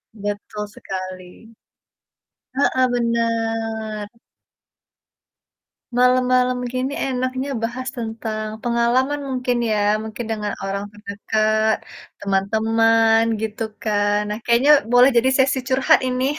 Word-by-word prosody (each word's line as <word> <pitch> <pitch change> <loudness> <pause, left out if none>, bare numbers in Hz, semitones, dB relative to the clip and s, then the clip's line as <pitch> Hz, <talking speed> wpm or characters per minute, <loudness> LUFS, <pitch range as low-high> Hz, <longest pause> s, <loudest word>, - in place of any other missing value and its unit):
Betul 205 0 -5
sekali. 185 +3 -8 1.0
Heeh, 260 -2 +2
benar. 225 -2 -1 1.9
Malam-malam 250 0 +3
gini 255 +1 -2
enaknya 255 +1 -2
bahas 255 +3 -3
tentang 220 -1 -4 0.2
pengalaman 240 +4 +1
mungkin 250 -1 -1
ya, 215 - +1 0.3
mungkin 220 +2 -6
dengan 210 -2 -2
orang 195 +1 -3
terdekat, 215 +1 0 0.4
teman-teman 225 +3 +2 0.2
gitu 220 0 -3 0.2
kan, 205 -1 +1
nah 210 - -3
kayaknya 240 +5 +4 0.2
boleh 245 +2 +7
jadi 260 +3 +4
sesi 265 0 +3
curhat 265 0 +4
ini. 255 0 0
225 Hz, 95 wpm, -21 LUFS, 215-250 Hz, 1.9 s, boleh